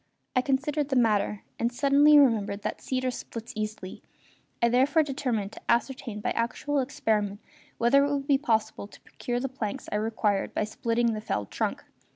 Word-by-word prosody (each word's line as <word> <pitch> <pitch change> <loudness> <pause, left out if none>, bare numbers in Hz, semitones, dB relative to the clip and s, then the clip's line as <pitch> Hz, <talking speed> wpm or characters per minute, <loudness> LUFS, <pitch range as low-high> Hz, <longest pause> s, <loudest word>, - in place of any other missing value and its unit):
I 255 - +4
considered 285 +2 0
the 270 - 0
matter 210 -4 +2 0.2
and 235 +1 +1
suddenly 285 +3 +5
remembered 215 -7 +3
that - - -4
cedar 255 -1 -1
splits 230 -1 -8
easily; 215 -3 -5 0.6
I 235 - +4
therefore 270 +7 +3
determined 250 -8 -2
to - - -12
ascertain 240 -3 0
by - - -1
actual 275 +5 -1
experiment 215 -6 -1 0.4
whether 270 +4 +4
it 285 - 0
would 280 -1 -1
be 275 -2 +3
possible 220 -6 -1
to - - -17
procure 245 0 -4
the 270 - -2
planks 240 -6 -5
I 210 - 0
required 210 -2 -1
by - - +1
splitting 230 +2 0
the 215 - -4
felled 105 - -3
trunk. - - -2
240 Hz, 175 wpm, -27 LUFS, 215-275 Hz, 0.6 s, suddenly